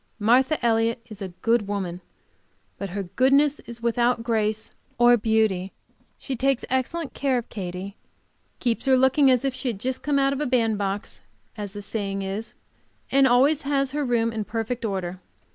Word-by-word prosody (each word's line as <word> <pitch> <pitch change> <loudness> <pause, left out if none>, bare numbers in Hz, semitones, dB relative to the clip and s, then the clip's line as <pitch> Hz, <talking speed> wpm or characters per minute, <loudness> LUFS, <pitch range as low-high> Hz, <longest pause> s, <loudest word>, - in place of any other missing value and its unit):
Martha 250 +8 +3
Elliott 230 0 +2
is 210 -1 -9
a 195 - -3 0.2
good 230 -3 +2
woman, 185 -3 -3 0.8
but 200 - -4
her 200 +2 -3
goodness 275 +9 +3
is 235 -1 -8
without 235 0 +1
grace 220 -2 -1 0.2
or 240 0 +6
beauty. 220 -4 +1 0.4
She 270 - -4
takes 270 +1 +1
excellent 270 +4 -1
care 270 -2 0
of 240 - -5
Katy, 190 0 -6 0.6
keeps 235 -2 -1
her 260 -1 +5
looking 265 +2 +4
as 255 0 +3
if 270 - 0
she 260 - -5
had 225 -5 -2
just 255 +4 -3
come 290 -1 0
out 275 0 +3
of 280 - -3
a 300 - 0
band 225 -4 +1
box, 200 +1 -3 0.3
as 205 -3 -6
the 205 -1 -7
saying 195 -2 -3 0.9
and 275 0 +5
always 270 +5 +4
has 275 -1 0
her 295 +1 -1
room 230 -3 +1
in 220 -1 -2
perfect 225 +3 -3
order. 185 -4 -3
235 Hz, 175 wpm, -24 LUFS, 205-265 Hz, 0.9 s, or